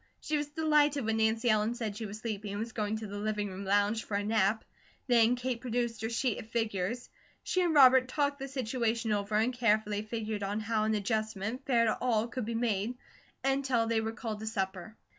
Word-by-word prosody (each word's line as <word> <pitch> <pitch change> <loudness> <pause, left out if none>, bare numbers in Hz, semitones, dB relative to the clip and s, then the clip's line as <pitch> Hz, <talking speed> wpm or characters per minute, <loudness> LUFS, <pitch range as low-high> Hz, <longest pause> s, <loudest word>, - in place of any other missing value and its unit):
She 305 - -2
was 295 -1 -1
delighted 295 -3 +2
when 225 0 0
Nancy 220 +2 +1
Ellen 215 +2 +1
said 220 -4 -3
she 220 0 -5
was 205 +1 -7
sleepy, 215 -2 -4
and 200 - -4
was 225 +1 -4
going 215 -1 -2
to 220 - -6
the 205 0 -6
living 210 -1 -1
room 190 +1 -7
lounge 205 +3 +2
for 205 - -4
a 205 - -1
nap. 215 0 +2 0.4
Then 240 -1 +4
Kate 245 -1 -3
produced 235 -2 -2
her 225 - -2
sheet 235 0 0
of 220 - -10
figures. 225 0 -2 0.4
She 370 - 0
and 340 -3 +1
Robert 260 -2 +7
talked 285 +2 0
the 270 - -4
situation 235 -3 -1
over 205 0 -1
and 225 +4 +2
carefully 215 -3 +1
figured 215 -1 -4
on 200 +2 -2
how 215 0 0
an 220 0 +1
adjustment, 215 +3 -2
fair 235 -3 +4
to 220 - +2
all, 230 -3 +1
could 245 -1 -4
be 230 +1 -3
made, 225 0 0 0.5
until 270 -3 +1
they 225 -1 +1
were 220 0 -2
called 225 -2 -5
to 220 - -6
supper. 195 0 -3
225 Hz, 215 wpm, -31 LUFS, 210-245 Hz, 0.5 s, Robert